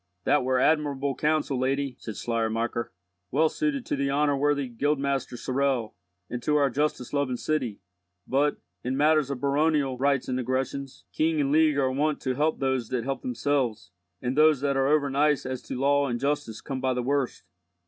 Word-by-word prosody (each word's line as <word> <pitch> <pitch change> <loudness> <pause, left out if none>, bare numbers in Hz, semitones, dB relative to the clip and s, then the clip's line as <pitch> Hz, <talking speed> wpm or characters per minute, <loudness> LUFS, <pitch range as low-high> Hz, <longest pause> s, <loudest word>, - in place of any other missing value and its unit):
"That - - +3
were 130 0 +1
admirable 145 -1 +1
counsel, 150 -2 0
lady," 135 +1 -1
said 110 - -7
Schleiermacher, 115 0 -1 0.4
"well 155 +7 +3
suited 280 - -2
to - - -1
the 140 0 -1
honour 145 +1 +2
worthy 145 -1 +1
guildmaster 140 +1 -1
Sorel, 130 -3 -1 0.3
and 120 0 -5
to 150 - +1
our 140 -2 +3
justice 145 -2 -1
loving 140 -3 0
city; 125 -9 -2 0.4
but, 145 +2 +1 0.3
in 130 +2 -2
matters 150 -1 +3
of 140 -3 -3
baronial 140 -2 +1
rights 140 -1 +1
and 130 0 -1
aggressions, 130 +2 -3
king 160 0 +1
and 140 -1 +1
League 155 -1 +4
are 130 -2 +2
wont 150 +3 0
to 130 - -1
help 150 +4 +1
those 130 -4 0
that 125 -3 -1
help 135 +2 -3
themselves, 135 - -1 0.3
and 125 +1 -1
those 155 -2 +5
that 140 -1 +1
are 135 0 +2
over 145 -1 +2
nice 145 0 +2
as 130 -1 -4
to 125 - -6
law 140 +1 +3
and 120 -2 -2
justice 140 -6 -2
come 135 -2 -5
by 130 -1 +1
the 125 - -1
worst." 135 -2 -1
140 Hz, 185 wpm, -27 LUFS, 130-145 Hz, 0.4 s, those